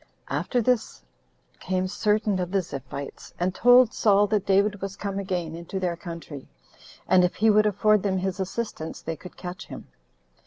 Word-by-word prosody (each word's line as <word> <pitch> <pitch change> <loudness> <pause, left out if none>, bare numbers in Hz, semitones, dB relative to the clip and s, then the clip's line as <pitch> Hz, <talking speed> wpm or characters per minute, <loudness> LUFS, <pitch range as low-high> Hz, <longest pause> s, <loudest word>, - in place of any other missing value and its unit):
9. - - +1
After 245 - 0
this 250 -1 0 0.6
came 185 0 -1
certain 210 0 +1
of 180 -1 -2
the 195 0 +1
Ziphites, 140 -1 -8
and 180 +1 0
told 245 +2 +6
Saul 205 -1 +4
that 205 -1 -1
David 200 +1 +2
was 195 0 -4
come 200 -1 -4
again 180 -4 -3
into 170 +3 -5
their 180 -2 -1
country, 165 -5 -8 0.6
and 185 -1 +5
if 180 - +1
he 220 0 +4
would 215 0 +4
afford 210 0 +3
them 190 -1 0
his 190 +1 -2
assistance, 190 -4 -4
they 165 - -3
could 180 - -13
catch 180 0 -7
him. - - -9
190 Hz, 180 wpm, -25 LUFS, 180-210 Hz, 0.6 s, told